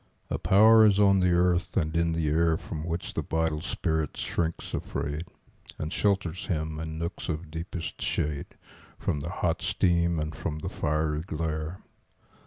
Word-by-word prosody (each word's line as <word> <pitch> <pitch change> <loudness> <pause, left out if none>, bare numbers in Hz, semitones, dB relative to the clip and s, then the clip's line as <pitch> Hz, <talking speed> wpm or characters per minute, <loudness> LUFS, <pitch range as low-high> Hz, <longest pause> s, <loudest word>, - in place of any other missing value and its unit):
A - - -1
power 110 +3 +7
is 105 -2 +5
on 100 -1 +5
the 90 -1 +3
earth 90 0 +2
and 80 -3 0
in 85 0 +2
the 80 -1 0
air 80 +2 +3
From 80 -2 -6
which 85 +1 -3
the - - -1
vital 80 -1 -1
spirit 80 -3 -1
shrinks 85 -1 -2
afraid, 75 +3 -3 0.5
And 80 +1 -4
shelters 95 -4 0
him, 80 -3 -2
in 80 0 -5
nooks 85 +2 -4
of 80 0 -4
deepest 80 +1 -5
shade, 75 -1 -1 0.5
From 75 - -1
the 75 +4 -4
hot 85 -1 -1
steam 85 -2 +2
and 75 +1 -3
from 75 - -3
the 75 - -4
fiery 75 0 0
glare. 80 +1 -3
80 Hz, 165 wpm, -28 LUFS, 75-90 Hz, 0.5 s, power